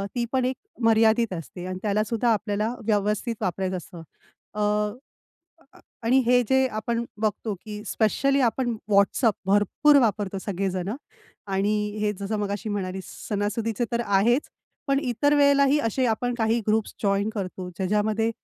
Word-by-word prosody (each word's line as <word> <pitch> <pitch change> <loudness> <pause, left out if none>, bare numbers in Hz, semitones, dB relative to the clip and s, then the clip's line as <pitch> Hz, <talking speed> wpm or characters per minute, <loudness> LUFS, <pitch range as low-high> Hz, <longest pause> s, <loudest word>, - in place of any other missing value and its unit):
ती 240 -1 0
पण 260 -1 +1
एक 260 +1 0 0.3
मर्यादित 225 -1 +4
असते 175 +1 -7
आणि 185 0 -5
त्याला 210 0 +1
सुद्धा 230 +1 0
आपल्याला 210 +1 -1
व्यवस्थित 210 +2 0
वापरायचं 185 +1 -1
असतं. 175 -1 -10 0.5
अ, 210 - -3 1.4
आणि 250 +3 +4
हे 245 0 +5
जे 265 0 +4
आपण 235 +2 -1 0.2
बघतो, 215 0 -1
की 210 +2 -9
स्पेशली 275 +7 +1
आपण 240 -1 +1 0.2
WhatsApp 200 +4 +4
भरपूर 205 +9 +4
वापरतो 205 -4 0
सगळे 195 0 -2
जणं 185 +5 -3 0.6
आणि 200 +2 +1 0.3
हे 210 0 +1
जसं 200 +2 -2
मगाशी 205 +1 -3
म्हणालीस 190 -2 -3 0.2
सणासुदीचे 215 +3 -1
तर 235 - +1
आहेच. 210 +7 +2 0.4
पण 275 -1 +2
इतर 285 +3 +1
वेळेलाही 280 0 +4
असे 255 +3 0
आपण 245 +2 0
काही 225 +1 +2
ग्रुप्स 215 0 0
जॉइन 200 0 +1
करतो, 185 -3 -5
ज्याच्यामध्ये 210 +4 +1
215 Hz, 145 wpm, -25 LUFS, 200-235 Hz, 1.4 s, हे